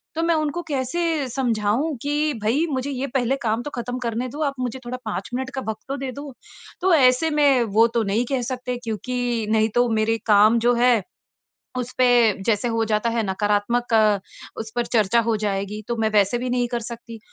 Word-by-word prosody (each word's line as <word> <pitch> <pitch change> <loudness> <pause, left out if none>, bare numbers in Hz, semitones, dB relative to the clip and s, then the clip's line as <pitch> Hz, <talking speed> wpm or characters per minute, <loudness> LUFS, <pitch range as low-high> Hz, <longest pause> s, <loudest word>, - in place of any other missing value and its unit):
तो 330 - -1
मैं 335 0 +2
उनको 305 +3 -2
कैसे 295 +2 -1
समझाऊँ 240 +3 0
कि 295 +1 0
भई 255 +10 +2
मुझे 265 0 -2
ये 270 +1 -3
पहले 255 +1 +1
काम 225 0 0
तो 290 - -5
ख़त्म 245 +1 -4
करने 235 +1 -2
दो - - -4
आप - - -18
मुझे 255 0 -3
थोड़ा 250 +1 -4
5 205 -3 -4
मिनट 260 +1 -2
का - - -1
वक़्त 220 - -6
तो 275 +1 -3
दे 270 -1 -4
दो। 280 +1 -8 0.5
तो 370 0 +3
ऐसे 260 +1 +4
में 275 -4 +4
वो 225 +1 +6
तो 230 - +2
नहीं 215 +4 0
कह 265 -2 +1
सकते 250 -1 -4
क्योंकि 240 0 -2
नहीं 220 0 +3
तो 245 0 +3
मेरे 225 +1 +1
काम 215 +2 +5
जो 245 - +5
है 245 -3 +4 0.8
उस 250 0 -4
पे 255 - +5 0.4
जैसे 225 +1 +1
हो 225 -1 0
जाता 215 +2 0
है 230 0 0
नकारात्मक 210 +5 0 0.7
उस 220 0 -5
पर 240 -1 0
चर्चा 225 0 +2
हो 225 - +2
जाएगी 200 +1 -2
तो 235 - -1
मैं 220 -1 +1
वैसे 205 +2 +3
भी 250 +1 -3
नहीं 245 0 +1
कर 240 0 -2
सकती। 230 0 -8
240 Hz, 205 wpm, -22 LUFS, 220-265 Hz, 0.8 s, वो